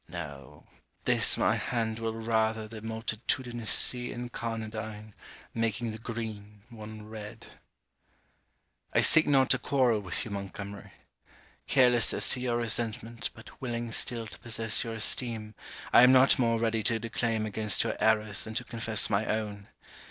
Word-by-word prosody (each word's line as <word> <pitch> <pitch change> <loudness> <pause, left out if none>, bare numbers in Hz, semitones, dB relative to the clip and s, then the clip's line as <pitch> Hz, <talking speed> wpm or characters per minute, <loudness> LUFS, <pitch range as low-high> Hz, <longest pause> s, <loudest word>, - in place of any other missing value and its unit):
No; 75 -4 -9 0.4
this - - +4
my - - +2
hand 115 -2 -2
will 115 -1 -3
rather 110 -1 0
The 110 0 -10
multitudinous 115 +1 -3
sea 125 0 +4
incarnadine, 110 -3 -6 0.4
Making 115 +1 -1
the 110 - -8
green, 105 -3 -7
one 110 -1 -10
red. 110 -1 -9 1.5
I - - +5
seek 155 - +7
not 135 -3 +3
to - - +5
quarrel 125 -5 +2
with 95 -4 -3
you, 110 - -8
Montgomery. 100 0 -7 0.8
Careless 125 -3 +4
as - - +3
to 130 - 0
your 125 -1 -1
resentment, 115 -1 -2
but 110 +3 -15
willing 120 -2 -4
still 115 0 -1
to - - -11
possess 115 -1 -1
your 115 -1 -5
esteem, 110 -1 0 0.4
I - - +9
am 125 +1 +8
not 130 +2 +5
more 115 -2 +2
ready 115 -1 0
to 115 +2 0
declaim 115 0 -2
against 110 0 +1
your - - -2
errors 110 -2 +1
than 110 0 -8
to 125 - -1
confess 115 -3 +1
my 100 +1 0
own. 105 -2 -3
110 Hz, 150 wpm, -29 LUFS, 110-120 Hz, 1.5 s, I